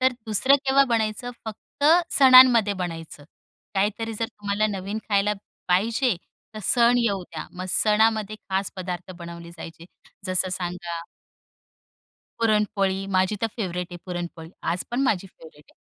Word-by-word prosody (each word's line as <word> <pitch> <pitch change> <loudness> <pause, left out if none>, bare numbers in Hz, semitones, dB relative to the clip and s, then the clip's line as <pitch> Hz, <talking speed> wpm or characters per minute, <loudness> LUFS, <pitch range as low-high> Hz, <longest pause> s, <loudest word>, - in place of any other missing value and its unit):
तर 260 0 +3
दुसरं 220 +6 +4
केव्हा 275 +1 +5
बनायचं? 225 +1 -1
फक्त 220 +6 -7 0.3
सणांमध्ये 255 -5 +8
बनायचं. 165 -5 -6 0.5
काहीतरी 215 +3 -1
जर 225 +2 -2
तुम्हाला 205 +1 -1
नवीन 200 +1 -4
खायला 205 0 +2 0.4
पाहिजे 225 +5 +2 0.4
तर 215 - -6
सण 240 +4 +4
येऊ 200 -5 0
द्या. 160 -3 -8
मग 185 +1 -6
सणामध्ये 215 +1 +2
खास 190 0 -1
पदार्थ 185 -1 -5
बनवले 170 0 -9
जायचे. 165 +1 -10 0.4
जसं 185 0 +1
सांगा 175 -2 -4 1.4
पुरणपोळी, 210 -3 +1
माझी 190 +3 +2
तर - - +3
फेव्हरेट 180 -4 -3
आहे 175 - -7
पुरणपोळी. 175 -2 -6
आज 170 +2 -1
पण 245 - -1
माझी 200 -7 0
फेव्हरेट 160 -5 -17
आहे. - - -27
200 Hz, 135 wpm, -24 LUFS, 180-225 Hz, 1.4 s, सणांमध्ये